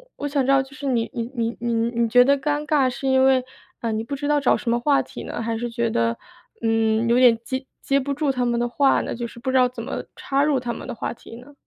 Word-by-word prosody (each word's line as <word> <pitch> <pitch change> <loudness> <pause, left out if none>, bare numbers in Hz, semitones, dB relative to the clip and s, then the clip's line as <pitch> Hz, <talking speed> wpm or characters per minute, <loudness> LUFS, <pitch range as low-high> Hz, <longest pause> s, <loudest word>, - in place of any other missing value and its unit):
我 290 - -6
想 280 -2 0
知 - - -2
道 270 -1 +4
就 270 +1 -16
是 290 -1 -6
你 235 -3 0
你 235 0 -4
你 230 0 -2
你 235 0 -1 0.3
你 230 - +3
觉 245 +2 +7
得 280 +2 +3
尴 295 +2 -1
尬 285 -4 +2
是 270 +2 -5
因 265 0 +4
为， 260 -1 +4 0.4
呃， 230 -1 -1
你 220 +1 -2
不 280 +4 -5
知 290 +1 -4
道 295 -1 +3
找 275 - +3
什 235 - -2
么 240 - +2
话 280 +2 +2
题 - - -9
呢？ - - -6
还 225 0 -2
是 240 +1 -3
觉 235 0 -1
得， 115 - 0 0.5
嗯， 225 0 +2
有 240 +2 +3
点 240 -3 +6
接 260 +2 -4 0.2
接 275 0 +1
不 280 +1 -3
住 290 -1 0
他 250 -1 -1
们 235 -1 0
的 240 - 0
话 270 +3 +2
呢， - - -4
就 235 0 -4
是 235 - -13
不 260 +2 -2
知 260 - +3
道 250 -1 +4
怎 235 -2 -8
么 270 - -4
插 275 +1 0
入 290 -3 +2
他 240 -1 -4
们 - - -8
的 245 - -5
话 - - -4
题 230 - -13
呢？ 265 +4 -14
250 Hz, 310 characters per minute, -23 LUFS, 235-275 Hz, 0.5 s, 觉